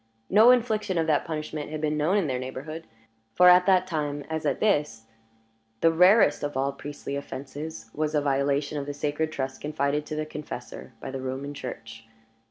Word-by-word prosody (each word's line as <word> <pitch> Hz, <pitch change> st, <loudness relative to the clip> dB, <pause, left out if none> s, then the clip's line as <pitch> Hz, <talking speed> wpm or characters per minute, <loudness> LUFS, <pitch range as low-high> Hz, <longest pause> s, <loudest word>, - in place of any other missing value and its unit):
No 220 Hz, +4 st, +7 dB
infliction 220 Hz, -6 st, +2 dB
of 165 Hz, -, +2 dB
that 155 Hz, -2 st, +1 dB
punishment 155 Hz, -2 st, -4 dB
had 155 Hz, 0 st, -4 dB
been 150 Hz, 0 st, 0 dB
known 155 Hz, +7 st, +2 dB
in 195 Hz, -, +1 dB
their 130 Hz, -3 st, -1 dB
neighborhood; 135 Hz, +5 st, -7 dB, 0.5 s
for 180 Hz, 0 st, +7 dB
at 180 Hz, +1 st, +6 dB
that 185 Hz, -1 st, +4 dB
time, 145 Hz, -4 st, -3 dB
as 160 Hz, -1 st, -2 dB
at 140 Hz, -, 0 dB
this, 150 Hz, -, +1 dB, 0.8 s
the 165 Hz, -, +5 dB
rarest 180 Hz, -1 st, +5 dB
of 145 Hz, -2 st, -3 dB
all 135 Hz, +1 st, +1 dB
priestly 140 Hz, 0 st, -7 dB
offenses 140 Hz, -3 st, -7 dB
was 155 Hz, 0 st, -1 dB
a -, -, +4 dB
violation 140 Hz, +1 st, 0 dB
of 140 Hz, -, -6 dB
the 145 Hz, -, -4 dB
sacred 150 Hz, +2 st, -1 dB
trust 130 Hz, -3 st, -4 dB
confided 150 Hz, 0 st, -1 dB
to 155 Hz, -, -4 dB
the 155 Hz, 0 st, -2 dB
confessor 150 Hz, -5 st, -8 dB
by 135 Hz, -, -6 dB
the 135 Hz, 0 st, -5 dB
Roman 135 Hz, +2 st, -4 dB
Church. 115 Hz, -4 st, -8 dB
150 Hz, 185 wpm, -26 LUFS, 140-160 Hz, 0.8 s, No